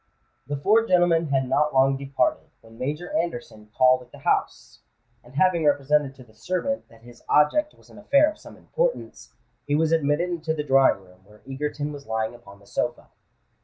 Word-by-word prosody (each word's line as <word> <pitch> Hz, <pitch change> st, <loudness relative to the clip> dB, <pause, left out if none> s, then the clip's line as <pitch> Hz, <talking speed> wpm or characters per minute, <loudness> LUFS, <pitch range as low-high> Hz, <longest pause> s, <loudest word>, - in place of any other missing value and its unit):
The 145 Hz, 0 st, -3 dB
four 220 Hz, +10 st, +3 dB
gentlemen 175 Hz, -2 st, +3 dB
had 135 Hz, -2 st, 0 dB
not 150 Hz, +2 st, +1 dB
long 135 Hz, +1 st, +4 dB
departed, 135 Hz, -2 st, -1 dB
when 115 Hz, 0 st, -17 dB
Major 150 Hz, +7 st, -4 dB
Anderson 120 Hz, -10 st, -4 dB
called 130 Hz, 0 st, +5 dB
at 125 Hz, -, -17 dB
the -, -, -13 dB
house; -, -, -2 dB, 0.4 s
and 125 Hz, +2 st, -18 dB
having 170 Hz, +1 st, +2 dB
represented 145 Hz, -1 st, +1 dB
to 130 Hz, -, -14 dB
the 110 Hz, -3 st, -22 dB
servant 185 Hz, -, -3 dB
that 115 Hz, 0 st, -20 dB
his 120 Hz, 0 st, -15 dB
object 295 Hz, -, +2 dB
was -, -, -22 dB
an -, -, -14 dB
affair 280 Hz, +8 st, +4 dB
of -, -, -16 dB
some -, -, -14 dB
importance, -, -, -3 dB, 0.3 s
he 145 Hz, -, +1 dB
was 160 Hz, +1 st, +1 dB
admitted 160 Hz, +2 st, +1 dB
into 160 Hz, -2 st, -2 dB
the 150 Hz, -, -3 dB
drawing 135 Hz, -8 st, +3 dB
room 90 Hz, 0 st, -21 dB
where 105 Hz, +2 st, -21 dB
Egerton 145 Hz, +2 st, -4 dB
was 140 Hz, -3 st, -11 dB
lying 110 Hz, 0 st, -2 dB
upon 120 Hz, -4 st, -15 dB
the 100 Hz, -, -21 dB
sofa. -, -, -3 dB
145 Hz, 190 wpm, -24 LUFS, 125-165 Hz, 0.4 s, called